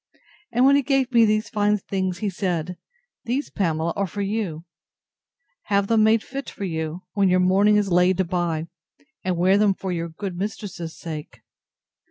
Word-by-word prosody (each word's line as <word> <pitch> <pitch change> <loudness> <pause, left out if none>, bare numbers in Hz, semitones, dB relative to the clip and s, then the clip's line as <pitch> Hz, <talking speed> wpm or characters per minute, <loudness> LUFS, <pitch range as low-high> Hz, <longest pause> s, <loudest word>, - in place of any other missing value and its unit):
And 250 +2 +3
when 275 +1 +6
he 285 - +4
gave 270 -1 +1
me 235 -2 +6
these 215 +1 +1
fine 210 -1 +2
things, 190 -2 -3
he 210 +1 -2
said, 180 -2 -2 0.5
These, 255 +5 -2
Pamela, 165 -4 0
are 200 -1 0
for 200 +4 -4
you; 195 -6 -3 1.0
have 200 -1 +2
them 220 +1 +3
made 220 0 +4
fit 275 +1 -6
for - - -8
you, 160 0 -4
when 200 -2 +3
your 185 0 +3
mourning 195 +3 +4
is 205 -2 +1
laid 180 +1 +3
by, 170 -3 -1 0.6
and 185 -1 -1
wear 190 +3 +4
them 205 -2 +3
for 190 0 -4
your 170 -1 -3
good 185 +3 -6
mistress's 185 -4 -5
sake. 155 -3 -8
195 Hz, 175 wpm, -23 LUFS, 175-210 Hz, 1.0 s, when